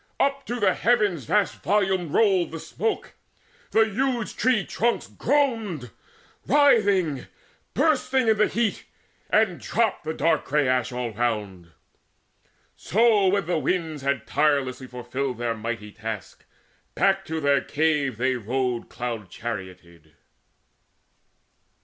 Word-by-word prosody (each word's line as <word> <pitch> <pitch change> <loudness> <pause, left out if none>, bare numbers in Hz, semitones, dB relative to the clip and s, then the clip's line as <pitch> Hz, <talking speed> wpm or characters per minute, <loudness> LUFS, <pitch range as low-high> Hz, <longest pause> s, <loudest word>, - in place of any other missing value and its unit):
Up 275 0 0
to 245 0 -3
the 190 -4 +3
heavens 210 - +1
Vast 210 - 0
volumed 190 -4 +1
rolled 190 -4 +3
the 165 - -7
smoke. 220 +7 -3 0.6
The 220 0 +4
huge 240 +1 -1
tree 235 -3 +2
trunks 235 +2 0
Groaned, 225 - -1 0.6
writhing, 205 - +3 0.5
bursting, 265 -5 +2
in 220 - +5
the 215 - +5
heat, 230 -2 -1 0.4
and 210 -5 +2
dropped 225 -2 0
The 160 +1 -4
dark 165 +3 +1
grey 145 -1 +1
ash 125 0 +1
all 125 -1 -3
round. 105 -7 -3 1.0
So 215 -1 +3
when 195 0 +2
the 170 -1 0
winds 160 -3 -2
Had 140 -3 -1
tirelessly 140 -4 0
fulfilled 125 +1 -4
their 120 -1 -1
mighty 110 -1 -5
task, 110 -1 -7 0.5
Back - - +2
to 160 0 -3
their 140 -2 +3
cave 150 -5 0
they 130 +2 +1
rode 125 +1 -2
cloud 115 -5 -5
charioted. 90 -8 -8
155 Hz, 125 wpm, -25 LUFS, -, 1.0 s, in